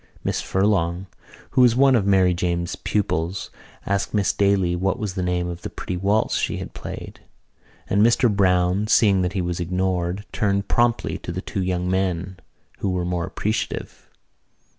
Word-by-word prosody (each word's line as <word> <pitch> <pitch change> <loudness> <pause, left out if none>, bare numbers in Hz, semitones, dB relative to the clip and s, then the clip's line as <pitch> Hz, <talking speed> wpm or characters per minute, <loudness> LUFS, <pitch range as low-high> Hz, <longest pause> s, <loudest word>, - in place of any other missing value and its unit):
Miss - - -1
Furlong, 95 -2 0 0.5
who - - +3
was 120 -2 +5
one 135 +1 +5
of 100 -4 +1
Mary 95 -2 +4
Jane's 85 0 -1
pupils, 95 -2 -2 0.3
asked 100 +2 -1
Miss 100 -2 +2
Daly 100 -3 +2
what 95 +5 0
was 105 -6 -3
the 95 - -3
name 90 -1 -1
of 85 0 -6
the - - -5
pretty 90 - -5
waltz 100 +4 +1
she - - -1
had - - -7
played; - - -8 0.7
and 100 - +2
Mr 120 +3 +4
Browne, 90 +1 +2
seeing 100 -4 +4
that 90 0 -1
he 95 - -1
was 85 0 -3
ignored, 90 +2 -1
turned 100 -1 0
promptly 120 -1 +1
to - - -6
the 90 - -4
two 95 0 -4
young 90 -1 -1
men 95 -1 -1 0.4
who 100 - -1
were 90 -1 -1
more 90 -1 -2
appreciative. 110 +1 -4
95 Hz, 170 wpm, -23 LUFS, 90-100 Hz, 0.7 s, was